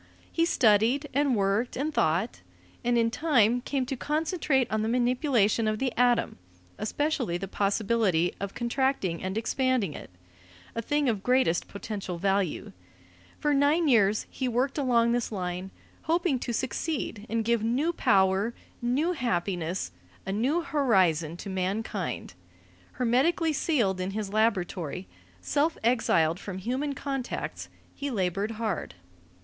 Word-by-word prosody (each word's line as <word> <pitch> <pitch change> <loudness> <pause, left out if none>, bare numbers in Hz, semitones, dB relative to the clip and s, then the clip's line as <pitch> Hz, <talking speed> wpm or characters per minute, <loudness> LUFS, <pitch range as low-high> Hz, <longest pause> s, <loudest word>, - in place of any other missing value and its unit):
He 330 - +2
studied 240 +1 +3
and 280 -2 +2
worked 200 +4 0
and 300 +4 -1
thought, 175 - 0 0.4
and 240 0 +2
in 230 0 +2
time 245 -4 +3
came 265 0 -1
to 270 +2 -3
concentrate 300 -1 0
on 215 0 +1
the 220 - 0
manipulation 240 -3 +2
of 215 0 0
the 260 +1 -1
atom, 245 - +2 0.4
especially 250 - -1
the 195 +2 -5
possibility 200 -3 +1
of 200 0 -5
contracting 240 -8 0
and 190 +2 -3
expanding 245 - 0
it - - -9 0.6
a 230 - -2
thing 290 +4 0
of 215 -5 0
greatest 250 -8 +2
potential 200 -3 -5
value. 195 - 0 0.7
For 295 -1 +1
nine 290 +4 +3
years 215 -5 +3
he 260 - -2
worked 255 +4 0
along 235 -4 +3
this 240 -1 0
line, 180 -1 -4 0.4
hoping 330 -4 +1
to 240 - -3
succeed 240 -3 -3
and 225 0 -1
give 235 -1 +2
new 260 +10 +1
power, 195 - +2 0.3
new 265 +8 +1
happiness, 180 - -2 0.3
a 195 - -2
new 260 - +1
horizon 185 - +2
to - - -8
mankind. 190 - -3 0.6
Hermetically 280 +7 +2
sealed 230 - +1
in 185 - -2
his 205 -2 -4
laboratory, 185 -5 0 0.3
self 300 +3 +1
exiled 185 -8 +2
from 195 -2 -6
human 260 +8 -2
contacts, 270 -2 -4 0.2
he 285 0 -4
labored 195 -2 -1
hard. 215 - -3
230 Hz, 135 wpm, -28 LUFS, 195-270 Hz, 0.7 s, studied